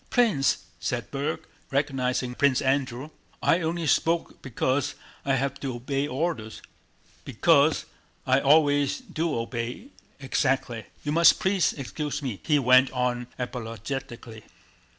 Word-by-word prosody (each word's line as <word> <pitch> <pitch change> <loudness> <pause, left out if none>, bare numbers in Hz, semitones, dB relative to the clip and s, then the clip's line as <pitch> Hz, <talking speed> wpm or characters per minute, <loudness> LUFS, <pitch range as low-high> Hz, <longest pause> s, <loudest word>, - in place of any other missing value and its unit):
"Prince," 155 - +2
said 120 -4 -3
Berg, 145 +3 -2 0.3
recognizing 130 -3 -1
Prince 130 0 +2
Andrew, 130 +1 -1 0.3
"I 170 - +4
only 165 +1 -2
spoke 165 +2 +1
because 130 +1 -1 0.3
I 135 -1 +1
have 140 +1 -2
to 135 -3 -4
obey 135 +4 -2
orders, 130 -6 -3 0.6
because 145 +4 +3 0.4
I 130 +1 +4
always 145 -1 +3
do 170 - -3
obey 115 - -4 0.3
exactly.... 130 -4 -1 0.2
You 145 - -2
must 170 +1 +6
please 190 -3 +2
excuse 145 +1 -4
me," 120 -8 -4
he 150 -2 +2
went 130 0 +5
on 125 -1 -1
apologetically. 120 -1 -6
135 Hz, 120 wpm, -26 LUFS, 125-150 Hz, 0.6 s, must